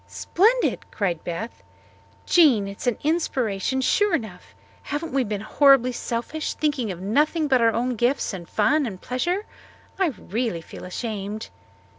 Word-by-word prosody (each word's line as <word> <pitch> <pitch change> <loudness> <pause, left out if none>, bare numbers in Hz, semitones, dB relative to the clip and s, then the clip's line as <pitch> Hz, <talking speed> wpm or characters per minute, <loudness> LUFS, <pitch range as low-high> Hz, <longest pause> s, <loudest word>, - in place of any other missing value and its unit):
"Splendid!" 460 +7 +1
cried 180 -6 -2
Beth. 180 +7 -5 0.6
"Jean, 265 - +5
it 200 0 -8
is - - -5
an 245 - +1
inspiration, 265 - 0
sure 410 +7 +3
enough. 215 - -7 0.3
Haven't 300 +3 -4
we 270 -1 +2
been 210 -3 -3
horribly 260 +2 +4
selfish 245 +6 -3
thinking 285 -8 -1
of 175 - -7
nothing 295 - +1
but 260 -4 +3
our 230 0 +5
own 240 +3 -1
gifts 245 +1 0
and 175 -3 -8
fun 300 -2 +2
and 190 -5 -7
pleasure? 350 - -2 0.5
I 380 - +3
really 225 - -3
feel 160 - -10
ashamed." 210 +2 -5
245 Hz, 150 wpm, -24 LUFS, 205-295 Hz, 0.6 s, Jean